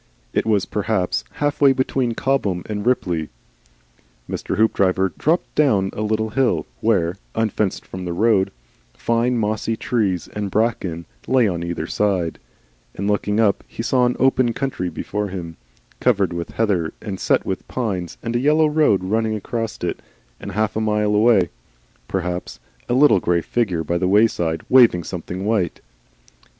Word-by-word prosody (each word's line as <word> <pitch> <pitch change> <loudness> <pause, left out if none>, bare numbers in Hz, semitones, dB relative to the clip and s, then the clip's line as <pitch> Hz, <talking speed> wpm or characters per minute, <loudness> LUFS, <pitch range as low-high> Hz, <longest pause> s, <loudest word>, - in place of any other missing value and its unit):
It - - 0
was 105 -3 +2
perhaps 95 - -1
half 145 0 -1
way 140 -1 +7
between 130 -2 0
Cobham 105 -11 0
and 105 -1 -4
Ripley. 85 -10 0 1.0
Mr. - - -3
Hoopdriver 95 -4 +2
dropped 165 +4 0
down 105 -11 +2
a - - -4
little 110 0 -1
hill, 130 0 +1
where, 95 -5 +1 0.2
unfenced 110 -3 -1
from 95 0 -7
the 90 - -3
road, 100 +1 +2 0.4
fine 120 +1 +1
mossy 110 +1 -1
trees 100 -7 -1
and 105 -1 -4
bracken 95 -6 -1 0.2
lay 130 -3 +4
on 85 -3 -2
either 85 -2 -3
side; 90 -3 -1 0.6
and 100 - -3
looking 105 0 0
up 105 -3 +2
he 115 - -6
saw 125 +1 +3
an 125 - -1
open 130 -2 +3
country 120 -10 -2
before 105 +3 -3
him, 85 -4 -6 0.4
covered 100 -8 +2
with 85 0 -4
heather 95 -8 0
and 95 -3 -6
set - - +1
with - - -4
pines, 95 -9 -3
and 115 0 -3
a - - +3
yellow 150 +4 +4
road 150 -11 +3
running 110 +3 0
across 115 +1 -4
it, - - -2 0.4
and 100 - -7
half 110 +2 0
a 110 - 0
mile 105 -1 +1
away 105 -4 +4 0.6
perhaps, 90 -1 -3 0.3
a 120 - +2
little 135 -7 +6
grey 85 -1 +1
figure 95 -4 -1
by 85 +3 -1
the 90 - +1
wayside 90 -6 +2
waving 120 -9 +6
something 90 +2 -5
white. 105 -6 0
105 Hz, 160 wpm, -21 LUFS, 90-115 Hz, 1.0 s, way